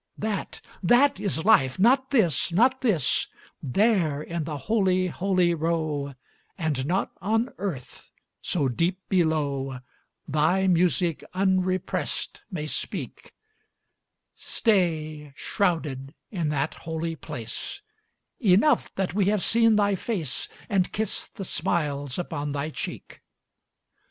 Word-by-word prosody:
That, 210 -2 -3 0.2
that 240 +5 +4
is 195 -5 -2
life 135 -13 +5
not 260 +7 +4
this 190 - +2
not 250 +9 +3
this: 205 - +2 0.3
There 170 - +2
in 170 -2 -3
the 150 -2 -4
holy, 185 0 +1
holy 180 -1 +2
row 155 -4 -1 0.4
And 150 -6 -1
not 185 +4 0
on 225 +5 0
earth, 175 -11 -6 0.3
so 150 -6 0
deep 170 +9 0
below 145 -7 +1 0.5
Thy 160 +6 +2
music 175 -2 +2
unrepressed 185 -1 0
may 160 -7 -4
speak; 155 - -5 1.0
Stay, 155 - 0
shrouded, 155 -8 -1 0.2
in 170 -7 -1
that 145 0 -1
holy 165 0 -4
place; 150 - -6 0.6
Enough 215 +6 +3
that 190 -2 -1
we 200 0 +2
have 205 -1 +1
seen 230 -1 +4
thy 205 -1 +3
face, 185 - -3 0.2
And 190 -1 +1
kissed 220 +1 -3
the 195 - -5
smiles 145 -7 -1
upon 145 -4 -3
thy 145 +2 -2
cheek. - - -7
175 Hz, 115 wpm, -26 LUFS, 150-200 Hz, 1.0 s, life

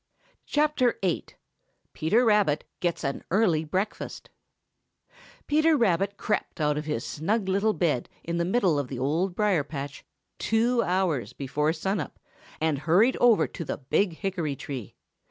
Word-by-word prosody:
VIII. 255 - +1 0.7
PETER 215 +11 +2
RABBIT 205 -9 +3 0.2
GETS 175 -2 -1
AN 140 -1 -2
EARLY 180 -5 +3
BREAKFAST 185 +6 -4 1.1
|PETER 310 +1 +3
RABBIT 200 -3 +1
crept 210 - -2
out 150 -1 +2
of 150 +1 -3
his 150 -6 -2
snug 195 +7 -1
little 200 +3 +2
bed 150 -11 0
in 170 0 -2
the 170 - +1
middle 180 -5 +2
of 140 - -2
the 130 - -6
Old 165 +8 0
Briar 200 -7 +2
patch 140 -1 -7 0.4
two 235 +2 +2
hours 180 - 0
before 150 +3 0
sun 190 +5 -1
up 150 - -6 0.4
and 155 -3 +1
hurried 180 - +4
over 240 -3 +5
to 170 - -6
the - - -4
big 170 +7 0
hickory 175 -7 -2
tree. 130 -6 -7
175 Hz, 145 wpm, -27 LUFS, 150-210 Hz, 1.1 s, over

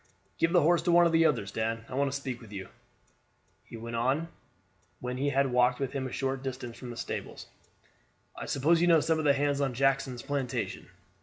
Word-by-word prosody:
"Give 165 - +3
the 175 -3 +4
horse 170 +2 +4
to 175 - +1
one 175 0 +6
of 170 - +3
the 165 0 +5
others, 115 -10 -1
Dan; 115 +1 -2
I - - -10
want 140 +1 +1
to 140 - -2
speak 130 -3 -5
to 115 - -13
you. 100 -2 -6
Dan," - - -19 0.9
he 115 - -10
went 115 +1 -6
on 135 +8 0 0.7
when 125 0 -4
he 140 +2 0
had 135 -1 +1
walked 125 0 +3
with 135 -2 -2
him 135 -2 -2
a - - -8
short 135 0 -2
distance 130 -3 -5
from 125 - -9
the 120 - -7
stables, - - -5 0.9
"I - - -7
suppose 160 +5 +2
you 175 - +4
know 165 -2 +6
some 160 +1 +1
of 155 - -2
the 140 - +6
hands 145 0 0
on 135 -3 -1
Jackson's 135 -2 +1
plantation." 140 -3 -3
135 Hz, 225 wpm, -29 LUFS, 125-145 Hz, 0.9 s, one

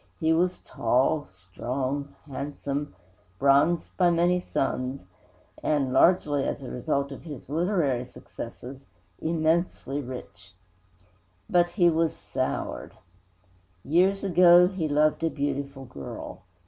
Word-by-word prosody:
He 160 -2 +3
was 180 +2 +1
tall, 130 +6 0
strong, 130 +10 -4
handsome, 145 0 -4 0.4
bronzed 140 - +3
by 180 -2 +4
many 175 +1 +3
suns, 130 - -2 0.6
and 140 -4 0
largely 145 -2 +4
as 140 - -3
a 130 - -7
result 140 +2 -1
of 135 - -9
his 145 -6 -9
literary 155 -6 +1
successes 130 +2 -10 0.3
immensely 160 -3 0
rich. 125 -7 -9 0.9
But 175 0 +3
he 175 0 +3
was 165 0 +1
soured. - - -4 0.9
Years 185 +7 +3
ago 180 -2 +7
he 185 -5 -2
loved 150 +2 +2
a 165 - +2
beautiful 140 -2 -3
girl. 70 - -8
145 Hz, 110 wpm, -26 LUFS, 135-170 Hz, 0.9 s, ago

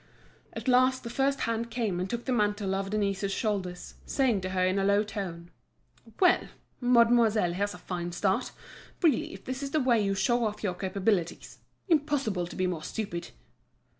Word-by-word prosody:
At - - -7
last 255 +1 +4
the 235 - -6
first 275 +2 +1
hand 230 0 -1
came 220 -6 -1
and 185 +1 -2
took 235 0 -4
the 260 - -1
mantle 205 -4 +1
off 195 0 -2
Denise's 200 -1 -1
shoulders, 195 -4 -3
saying 250 -8 +1
to 185 - -3
her 185 -1 +1
in 185 +2 +1
a - - +1
low 200 +1 +3
tone: 180 -5 -6 0.7
"Well! 360 -2 +4 0.3
mademoiselle, 235 -6 +4
here's 205 +3 -2
a - - -9
fine 175 -1 -4
start. 195 +7 0 0.5
Really, 310 -8 +3
if 190 - -11
this 260 +1 -4
is 280 - -3
the 310 - +1
way 240 -5 +3
you 195 0 0
show 240 +5 +2
off 210 0 -4
your 190 -4 0
capabilities—Impossible 200 - -1
to - - -9
be 185 - 0
more 175 -3 -2
stupid!" 200 -1 -4
210 Hz, 175 wpm, -29 LUFS, 190-240 Hz, 0.7 s, last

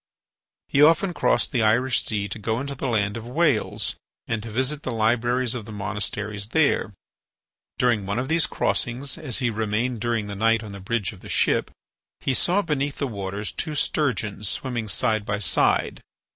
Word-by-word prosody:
He 140 - +2
often 165 +4 +5
crossed - - +2
the 125 -5 +1
Irish 120 +4 +3
Sea 105 -2 -1
to 105 - -5
go 110 +2 -1
into 140 +1 -4
the 135 0 -3
land 105 -3 0
of 115 0 -7
Wales 145 -3 +1 0.3
and 115 -2 -2
to 115 - -7
visit 130 +6 0
the 130 - -3
libraries 120 +2 +2
of 120 -4 -5
the 110 - -9
monasteries 105 0 -3
there. 140 -7 +2 0.8
During 115 -6 +2
one 100 +3 -1
of 130 +2 -1
these 165 +2 +2
crossings, 125 +4 -1
as 140 -8 -2
he 125 -4 0
remained 110 +2 -1
during 115 -3 0
the 100 0 -6
night 115 +2 +2
on 105 - -8
the 100 - -8
bridge 105 +1 -2
of 95 - -14
the - - -11
ship, - - +2 0.5
he 135 - 0
saw 185 +9 +2
beneath 145 -3 -1
the 140 - 0
waters 100 -3 -4
two 155 - -3
sturgeons 110 -10 0
swimming 120 -4 -2
side 110 0 +1
by 100 -1 -1
side. 100 -5 +1
115 Hz, 185 wpm, -24 LUFS, 105-130 Hz, 0.8 s, often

